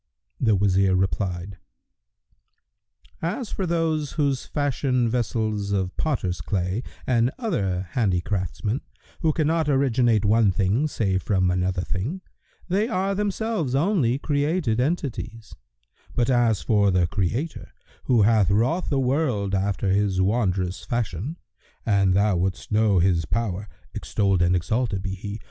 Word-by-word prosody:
The 110 -4 +3
Wazir 95 -1 +3
replied, 95 -1 -2 1.6
"As 205 +8 -3
for 190 - -2
those, 160 -3 0
who 145 -3 +1
fashion 130 -2 -1
vessels 110 -3 -1
of 95 -2 -1
potter's 105 - -1
clay,[FN#119] 95 +4 -2 0.2
and 120 -1 +2
other 95 - -1
handicraftsmen, 100 - -1 0.4
who 160 -3 +2
cannot 160 0 +1
originate 125 -6 +2
one 105 -1 +4
thing 100 +10 +1
save 95 -9 -1
from 95 -2 +1
another 90 0 0
thing, 120 - -3 0.5
they 200 +5 +1
are 195 -3 0
themselves 205 - -1
only 145 - +2
created 145 -4 0
entities; 125 -6 -3 0.6
but, 120 +2 +2
as 120 -4 +2
for 105 -3 +3
the 90 -2 +3
Creator, 105 - -3 0.3
who 120 -4 +4
hath 105 -3 +4
wrought 120 - +1
the 140 - +1
world 125 -7 0
after 95 0 0
this 100 -2 +1
wondrous 95 -3 0
fashion, 120 - -3 0.5
an 100 -4 +3
thou 100 +1 +3
wouldst 95 +2 -2
know 105 -2 +3
His 85 -2 +2
power 105 0 -2 0.3
(extolled 95 -3 0
and 90 +1 +3
exalted 105 +2 -1
be 95 -1 -3
He!) 100 +2 -6
110 Hz, 130 wpm, -24 LUFS, 95-140 Hz, 1.6 s, one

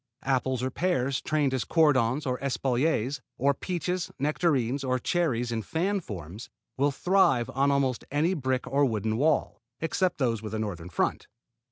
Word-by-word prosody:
Apples 130 -1 0
or 130 - -1
pears 140 -6 0
trained 150 -3 +1
as 130 -4 0
cordons 145 -3 +2
or 125 -1 -1
espaliers, 135 0 0 0.2
or 140 +2 +3
peaches, 180 +3 -3
nectarines, 140 -3 +1
or 130 -1 +1
cherries 125 -5 0
in 115 -1 -1
fan 185 - -1
forms, 100 - -8 0.3
will 140 +2 +2
thrive 145 -5 +2
on 140 +2 +2
almost 135 -3 +1
any 155 +6 +1
brick 130 -6 -1
or 140 +2 +1
wooden 110 -4 0
wall, 145 +5 +1 0.2
except 180 +3 0
those 120 -6 0
with 110 0 -5
a - - -2
northern 90 -5 -4
front. 85 - -1
135 Hz, 160 wpm, -27 LUFS, 120-155 Hz, 0.3 s, or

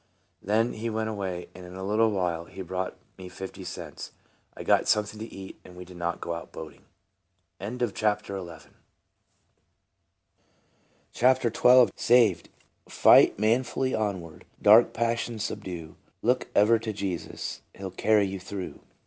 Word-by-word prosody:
Then 110 +4 +1
he 115 +2 -4
went 110 0 -2
away, 95 -4 -4
and 90 - -11
in 90 0 -10
a 95 - -6
little 110 +3 +2
while 90 -5 -1
he 95 - -8
brought 95 +1 -4 0.2
me 90 -1 -8
fifty 95 +1 -8
cents. - - -8 0.4
I - - -6
got - - +3
something 105 0 +1
to 110 +1 -7
eat, 95 0 -10
and 90 - -14
we 90 0 -9
did 90 0 -13
not 85 0 -2
go 85 - -4
out 85 - -7
boating. 80 - -10 0.7
52 120 +3 -2
TRANSFORMED. 100 -7 -3 2.5
CHAPTER 125 -2 +3
XII. 125 0 +6
SA 120 - +1 0.2
VED. - - -18 0.3
" - - -29
Fight - - +7
manfully 125 +4 +1
onward, 95 -7 -3
Dark 110 +3 +7
passions 115 -1 -1
subdue, 85 -6 -6 0.3
Look - - +1
ever 110 +3 +5
to 115 -1 -4
Jesus, 95 -4 -5
He - - -15
'11 95 -2 -7
carry 105 -2 +3
you 95 0 -4
through." 95 0 -7
100 Hz, 150 wpm, -27 LUFS, 90-110 Hz, 2.5 s, Fight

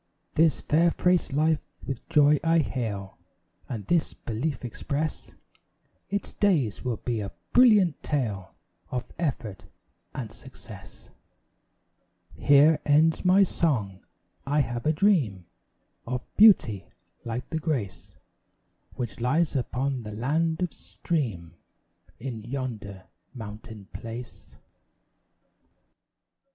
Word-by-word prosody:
This 155 -5 +3
fair 165 +3 +3
fresh 180 -1 +1
life 155 +2 +2 0.2
with 135 -4 -6
joy 150 0 +5
I 165 0 +3
hail, 110 -10 -2 0.5
And 110 -6 -5
this 170 - +1
belief 125 +4 -3
express, 140 +6 -4 0.8
Its 200 +1 -3
days 155 - +1
will 125 -3 -1
be 120 -3 -2
a 100 -1 -5 0.2
brilliant 210 - +5
tale 105 -10 -2 0.3
Of 125 0 -2 0.2
effort 125 - -3 0.5
and 115 -5 -5
success. 105 -6 -13 1.2
Here 145 +2 +5
ends 155 +2 +3
my 190 +2 +6
song; 115 - -1 0.4
I 145 +2 +2
have 120 0 -3
a - - +5
dream 150 - +2 0.6
Of 125 0 -2
beauty 125 - +5 0.4
like 120 +1 -5
the 160 - -1
grace 135 - -3 0.8
Which 120 -2 -5
lies 150 +7 +1
upon 130 +1 -1
the 105 -3 -7
land 160 +9 0
of 180 - -2
stream 110 - -3 0.7
In 120 -2 -5
yonder 110 -7 -5 0.3
mountain 105 -2 -9
place. 115 +1 -8
130 Hz, 105 wpm, -27 LUFS, 110-160 Hz, 1.2 s, my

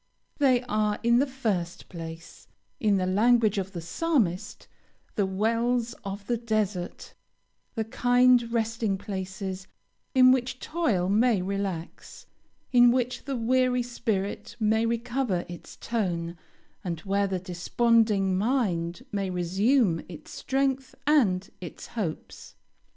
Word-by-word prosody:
They 260 -3 +4
are, 210 -3 0
in 235 +1 +4
the 280 - +2
first 210 -10 -3
place, 165 -1 -9 0.3
in 210 -3 +3
the 185 - 0
language 215 +2 +3
of 195 0 -5
the 170 - -5
Psalmist, 195 - -1 0.5
"the 200 -2 +1
wells 230 +4 0
of 200 0 -6
the 240 +2 0
desert;" 215 -6 -2 0.6
the 225 - 0
kind 245 +1 +3
resting 225 -3 0
places 190 -1 -5 0.5
in 255 -1 +8
which 255 0 0
toil 235 - 0
may 215 +2 +3
relax, 195 -3 -5 0.5
in 245 -1 +7
which 250 0 0
the 275 -1 -2
weary 250 +1 +2
spirit 220 -5 -3
may 220 +1 +2
recover 235 -4 -1
its 175 -1 -10
tone, 175 -7 -2 0.5
and 170 -4 -4
where 200 0 +1
the 190 -1 -1
desponding 195 +2 +2
mind 195 -3 0
may 195 -3 -1
resume 185 +2 +2
its 155 -4 -10
strength 270 0 -1
and 205 -11 +3
its 175 - -8
hopes. 195 -10 -5
215 Hz, 125 wpm, -27 LUFS, 190-245 Hz, 0.6 s, in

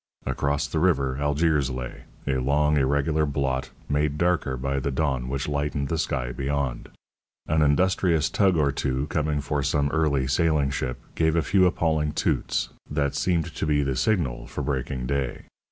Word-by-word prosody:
Across 70 0 0
the 80 - -1
river 70 -7 +2
Algiers 75 -1 +2
lay, 65 -1 -6 0.2
a 65 -1 0
long, 75 +3 +2
irregular 70 +2 +2
blot, 65 -2 -1 0.2
made 75 0 0
darker 85 -6 +1
by 70 +2 -1
the 70 - -2
dawn 65 -3 -1
which 70 0 -2
lightened 70 -1 -1
the 80 - -1
sky 65 -6 -1
beyond. 70 -2 -2 0.6
An 80 0 +1
industrious 80 +1 +3
tug 95 -4 +2
or 70 -2 +3
two, 65 -1 -1
coming 75 -2 0
for 70 +1 -1
some 70 +1 +1
early 75 -5 +1
sailing 70 +1 +2
ship, 65 -3 -2 0.2
gave 80 0 +1
a 85 - +2
few 95 +1 +4
appalling 80 -3 0
toots, - - 0 0.2
that 70 -1 0
seemed 85 -3 0
to - - -2
be 75 -1 +2
the 70 -1 -1
signal 65 - 0
for - - -5
breaking 65 -2 -2
day. 70 -1 -2
70 Hz, 170 wpm, -25 LUFS, 65-80 Hz, 0.6 s, few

